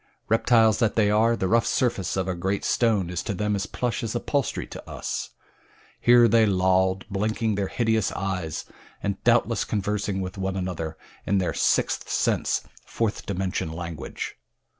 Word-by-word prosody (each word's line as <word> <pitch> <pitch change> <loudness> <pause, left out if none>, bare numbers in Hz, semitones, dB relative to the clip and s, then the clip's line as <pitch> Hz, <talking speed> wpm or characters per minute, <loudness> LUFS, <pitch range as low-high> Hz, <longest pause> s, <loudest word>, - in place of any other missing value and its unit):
Reptiles 110 -1 +4
that 115 -3 +2
they 105 -2 +3
are, 115 +2 +4
the 95 - -1
rough 115 +3 +3
surface 100 -9 0
of 95 -1 0
a 95 - 0
great 95 +3 -2
stone 105 -7 +2
is 90 - -2
to 100 - -3
them 105 +2 0
as 100 - -2
plush 120 -2 -2
as 115 0 -3
upholstery 140 +3 -1
to - - -10
us. - - -4 0.7
Here 120 0 +6
they 115 0 +4
lolled, 95 0 +2
blinking 110 +2 -1
their 100 -1 -1
hideous 110 -3 +1
eyes, 95 -5 -3 0.4
and 100 0 -2
doubtless 115 -1 +3
conversing 105 -1 -1
with 95 +1 -5
one 95 0 -2
another 85 -4 -4 0.3
in 100 - +2
their 95 -2 0
sixth - - +1
sense - - +1 0.2
fourth 115 -3 -2
dimension 95 -4 -2
language. 85 -2 -6
100 Hz, 160 wpm, -25 LUFS, 95-115 Hz, 0.7 s, Here